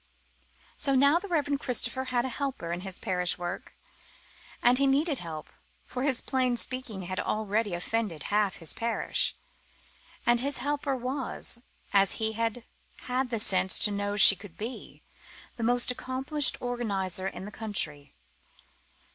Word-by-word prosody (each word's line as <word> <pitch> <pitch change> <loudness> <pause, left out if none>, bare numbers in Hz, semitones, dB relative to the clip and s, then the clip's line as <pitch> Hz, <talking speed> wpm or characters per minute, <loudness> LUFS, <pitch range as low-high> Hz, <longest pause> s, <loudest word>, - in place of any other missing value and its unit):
So 275 -2 +2
now 280 +5 +5
the 405 - -8
Reverend 290 -5 0
Christopher 260 +1 0
had 245 -1 0
a - - -2
helper 265 - -4
in 175 +1 -3
his 190 -1 -5
parish 180 -4 0
work; 175 +1 -6 0.8
and 245 +2 +4
he 275 - +3
needed 285 +1 +2
help, 160 -3 -7 0.3
for 250 - -5
his 265 -2 +2
plain 255 -2 0
speaking 245 -7 -3
had 185 +1 -4
already 215 -2 -1
offended 180 -3 -2
half 205 -2 +2
his 165 -2 -4
parish. 230 0 0 0.9
And 240 0 +4
his 280 +3 0
helper 285 +1 -1
was, 255 -1 -2 0.3
as 195 -1 +5
he 220 0 -1
had 230 +1 -2 0.4
had 255 +1 -1
the 230 -2 -1
sense 190 -3 +3
to 210 - +2
know 205 0 -2
she 200 0 +10
could 195 -3 -13
be, 230 +4 -8 0.5
the 235 - -4
most 245 +2 +5
accomplished 265 +3 -1
organiser 195 -7 -1
in 190 - -6
the 210 - -8
country. 160 -11 -1
230 Hz, 150 wpm, -28 LUFS, 195-260 Hz, 0.9 s, she